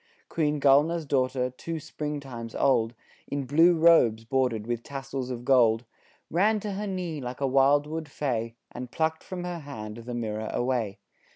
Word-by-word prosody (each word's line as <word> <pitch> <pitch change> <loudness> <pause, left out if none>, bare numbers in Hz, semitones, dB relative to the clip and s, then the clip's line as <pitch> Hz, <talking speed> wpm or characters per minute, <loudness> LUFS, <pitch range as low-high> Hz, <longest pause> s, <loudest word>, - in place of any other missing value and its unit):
Queen 150 -2 0
Gulnaar's 150 +4 +4
daughter 130 -2 0
two 165 +6 -5
spring 150 -1 -4
times 120 -5 -8
old, 120 -4 +2 0.3
In 140 -1 -3
blue 165 +6 +5
robes 125 -10 +5
bordered 125 -3 0
with 120 0 -2
tassels 135 -1 -5
of 120 -1 -5
gold, 120 -3 +4 0.5
Ran 210 +6 +3
to 210 - -3
her 205 +2 -3
knee 180 -6 -3
like 125 0 -6
a 140 - +1
wildwood 145 +4 +2
fay, 115 -5 -2 0.2
And 125 0 -7
plucked 160 +3 -1
from 180 -1 -6
her 175 -1 -4
hand 110 -8 -7
the 120 +1 -6
mirror 110 -2 -3
away. 120 -5 -1
135 Hz, 165 wpm, -27 LUFS, 120-160 Hz, 0.5 s, blue